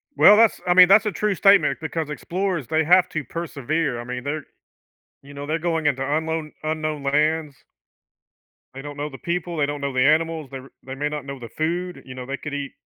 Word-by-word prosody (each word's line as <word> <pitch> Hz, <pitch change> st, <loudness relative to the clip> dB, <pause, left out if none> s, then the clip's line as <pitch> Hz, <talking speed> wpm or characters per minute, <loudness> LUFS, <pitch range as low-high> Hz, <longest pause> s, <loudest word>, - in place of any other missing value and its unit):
Well, 210 Hz, -, +7 dB
that's 225 Hz, -1 st, +4 dB
I 180 Hz, -, +4 dB
mean, 180 Hz, 0 st, +8 dB
that's 200 Hz, +3 st, +6 dB
a 210 Hz, -, 0 dB
true 210 Hz, -1 st, -1 dB
statement 200 Hz, +1 st, +4 dB
because 160 Hz, -1 st, -3 dB
explorers, 175 Hz, 0 st, -3 dB
they 160 Hz, 0 st, +1 dB
have 180 Hz, +3 st, +4 dB
to 155 Hz, -2 st, -3 dB
persevere, 155 Hz, -4 st, -3 dB
I 120 Hz, -, -5 dB
mean, 125 Hz, 0 st, -6 dB
they're 145 Hz, +1 st, -4 dB, 0.8 s
you 140 Hz, +1 st, -13 dB
know, 140 Hz, 0 st, -7 dB
they're 155 Hz, +2 st, -1 dB
going 165 Hz, -2 st, -1 dB
into 135 Hz, -2 st, +1 dB
unknown 155 Hz, +2 st, -2 dB
unknown 155 Hz, -1 st, -3 dB
lands. 150 Hz, +1 st, 0 dB, 1.2 s
They 135 Hz, -, -7 dB
don't 145 Hz, 0 st, -8 dB
know 145 Hz, +1 st, -3 dB
the 135 Hz, -, -10 dB
people. 170 Hz, 0 st, -3 dB
They 145 Hz, -, +2 dB
don't 145 Hz, 0 st, -5 dB
know 140 Hz, -1 st, -2 dB
the 130 Hz, -, +1 dB
animals. 160 Hz, -1 st, +1 dB
They're 135 Hz, 0 st, -9 dB, 0.2 s
they 130 Hz, 0 st, -6 dB
may 145 Hz, +2 st, -2 dB
not 150 Hz, -2 st, -5 dB
know 140 Hz, -1 st, -7 dB
the 120 Hz, -2 st, -9 dB
food. 175 Hz, +6 st, -3 dB
You 130 Hz, -, -10 dB
know, 130 Hz, -1 st, -7 dB
they 135 Hz, +2 st, -4 dB
could 150 Hz, -, -7 dB
eat 145 Hz, -1 st, -4 dB
155 Hz, 220 wpm, -23 LUFS, 140-165 Hz, 1.2 s, mean